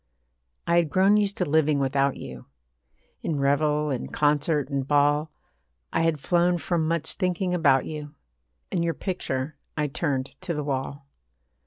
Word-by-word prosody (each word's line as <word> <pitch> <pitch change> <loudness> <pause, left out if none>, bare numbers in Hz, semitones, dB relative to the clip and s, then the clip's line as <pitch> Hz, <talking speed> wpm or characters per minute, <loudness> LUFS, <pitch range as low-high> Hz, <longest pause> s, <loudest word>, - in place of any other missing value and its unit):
I 170 - +3
had 170 -3 +3
grown 190 +6 +4
used 205 0 0
to 180 - +1
living 155 -1 +2
without 135 0 +1
you. 65 -1 -9 0.7
In 155 -4 -2
revel 150 +2 +2
and 130 - -4
concert 150 0 +1
and 135 -1 -1
ball, 145 +1 +2 0.6
I - - +2
had 165 -2 +1
flown 175 +3 +2
from 170 -1 -1
much 165 -1 0
thinking 180 -1 -1
about 140 -7 +3
you, 150 -2 -7 0.6
And 170 - 0
your 165 -2 0
picture 145 -6 -3 0.2
I 150 - +1
turned 140 -2 -3
to 180 -3 -3
the 150 - -2
wall. 140 0 -3
150 Hz, 155 wpm, -25 LUFS, 140-170 Hz, 0.7 s, grown